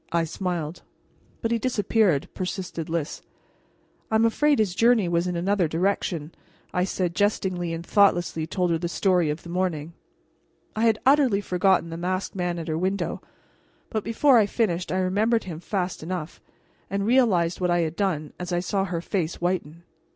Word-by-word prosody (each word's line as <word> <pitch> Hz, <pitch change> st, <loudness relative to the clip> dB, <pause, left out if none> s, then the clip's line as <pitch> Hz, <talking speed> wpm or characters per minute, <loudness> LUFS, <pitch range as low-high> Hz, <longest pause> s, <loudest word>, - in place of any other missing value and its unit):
I 170 Hz, 0 st, +2 dB
smiled. 170 Hz, -1 st, -3 dB, 0.6 s
"But 225 Hz, -, 0 dB
he 235 Hz, -, +1 dB
disappeared," 210 Hz, -, +1 dB
persisted 180 Hz, -3 st, -4 dB
Lys. 165 Hz, -1 st, -3 dB, 0.9 s
"I'm 220 Hz, +1 st, +3 dB
afraid 290 Hz, +5 st, +3 dB
his 210 Hz, -5 st, +1 dB
journey 230 Hz, -1 st, +4 dB
was 170 Hz, +1 st, +1 dB
in 180 Hz, -, -2 dB
another 185 Hz, +1 st, +1 dB
direction," 170 Hz, -2 st, -1 dB, 0.4 s
I 180 Hz, 0 st, +1 dB
said 180 Hz, -2 st, -2 dB
jestingly, 185 Hz, -3 st, 0 dB
and 165 Hz, +1 st, -5 dB
thoughtlessly 175 Hz, -6 st, +2 dB
told 180 Hz, +1 st, 0 dB
her 165 Hz, -, +1 dB
the 170 Hz, -, -2 dB
story 180 Hz, -3 st, +2 dB
of 150 Hz, +2 st, -4 dB
the 170 Hz, -, -10 dB
morning. 170 Hz, -3 st, -2 dB, 0.8 s
I 220 Hz, +1 st, +1 dB
had 225 Hz, -2 st, +4 dB
utterly 265 Hz, -7 st, +4 dB
forgotten 185 Hz, -3 st, +1 dB
the 165 Hz, -, -5 dB
masked 185 Hz, +2 st, -2 dB
man 175 Hz, -2 st, -1 dB
at 165 Hz, -, -5 dB
her 160 Hz, 0 st, -1 dB
window, 190 Hz, +2 st, -1 dB, 0.7 s
but 215 Hz, -2 st, -1 dB
before 245 Hz, +2 st, +4 dB
I 210 Hz, -, +3 dB
finished 185 Hz, -6 st, -1 dB
I 185 Hz, -, 0 dB
remembered 205 Hz, +5 st, +1 dB
him 165 Hz, -4 st, -7 dB
fast 185 Hz, 0 st, -3 dB
enough, 170 Hz, 0 st, -5 dB, 0.5 s
and 200 Hz, +1 st, -1 dB
realized 205 Hz, -9 st, +3 dB
what 180 Hz, -, +1 dB
I 175 Hz, 0 st, +3 dB
had 160 Hz, -1 st, -2 dB
done 170 Hz, -7 st, -1 dB
as 180 Hz, 0 st, -5 dB
I 175 Hz, -, +1 dB
saw 195 Hz, +2 st, -1 dB
her 175 Hz, -3 st, -3 dB
face 175 Hz, -3 st, -2 dB
whiten. 170 Hz, -2 st, -2 dB
180 Hz, 175 wpm, -25 LUFS, 170-205 Hz, 0.9 s, journey